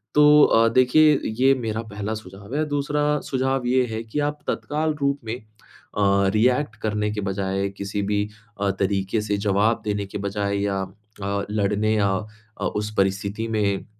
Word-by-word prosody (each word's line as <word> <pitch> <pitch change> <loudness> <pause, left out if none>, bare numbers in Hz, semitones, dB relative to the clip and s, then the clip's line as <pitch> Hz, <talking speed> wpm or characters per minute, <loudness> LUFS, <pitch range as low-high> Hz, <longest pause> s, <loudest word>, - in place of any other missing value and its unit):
तो 150 0 +7
अ, 115 0 +5
देखिए 145 +4 +5 0.2
ये 135 +1 +6
मेरा 110 0 -2
पहला 105 +1 -3
सुझाव 100 +3 -9
है। 155 - +1
दूसरा 150 +1 0
सुझाव 130 -1 0
ये 125 0 +3
है 110 +1 -3
कि 115 +6 -4
आप 150 - -17
तत्काल 155 +1 -1
रूप 140 0 +1
में 115 +2 -3
अ, 100 -2 -1
रिएक्ट 125 +2 +2
करने 105 -1 0
के 105 -1 -3
बजाय 95 0 -1
किसी 100 +1 -3
भी 105 +1 0 0.3
अ, 100 -1 +2
तरीके 100 +2 0
से 105 -1 -1
जवाब 105 +3 +1
देने 100 -1 -1
के 95 - -6
बजाए 100 0 -2
या 100 -1 -1 0.4
अ, 100 0 -1
लड़ने 105 +1 +1
या 100 -2 +2 0.5
अ, - - 0
उस 105 +1 -3
परिस्थिति 100 +3 0
में, 105 -3 0
105 Hz, 165 wpm, -23 LUFS, 100-125 Hz, 0.5 s, तो